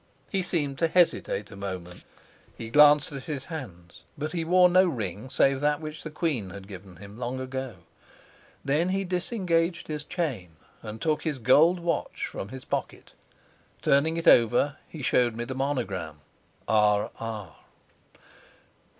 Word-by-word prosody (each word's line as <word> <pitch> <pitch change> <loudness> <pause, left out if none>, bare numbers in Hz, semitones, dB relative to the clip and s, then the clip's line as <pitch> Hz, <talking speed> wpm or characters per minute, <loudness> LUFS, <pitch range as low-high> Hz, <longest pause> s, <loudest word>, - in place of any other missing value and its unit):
He 195 - +1
seemed 150 -7 -2
to 165 - +3
hesitate 160 - +1
a - - -9
moment; 95 -3 -7 0.5
he 115 -1 -7
glanced 150 +1 +6
at 135 -2 -7
his 145 -4 -4
hands, 95 - -9
but 150 +1 -3
he 170 -1 -2
wore 180 +2 +5
no 185 +1 +5
ring 110 - -4
save 135 +1 +3
that 150 0 +2
which 155 -1 -7
the 155 - -6
queen 150 - -1
had 95 0 -10
given 95 -2 -11
him 100 +5 -12
long 125 +1 -3
ago. 130 -2 -5 0.9
Then 150 +6 +1
he 195 +1 0
disengaged 180 -2 -1
his 150 -1 -3
chain 130 - -4 0.3
and 110 +1 -7
took 155 -2 0
his 155 -4 -2
gold 150 +9 +5
watch 170 -3 -2
from 95 - -6
his 130 +1 -9
pocket. - - -4 0.7
Turning 155 +4 +3
it 165 - -3
over, 120 +5 +5
he 155 -4 -8
showed 120 -2 +2
me 120 - -3
the 130 - -5
monogram, 105 - -3 0.5
R. 105 -1 +3
R. 110 -4 -6
135 Hz, 155 wpm, -27 LUFS, 105-160 Hz, 0.9 s, glanced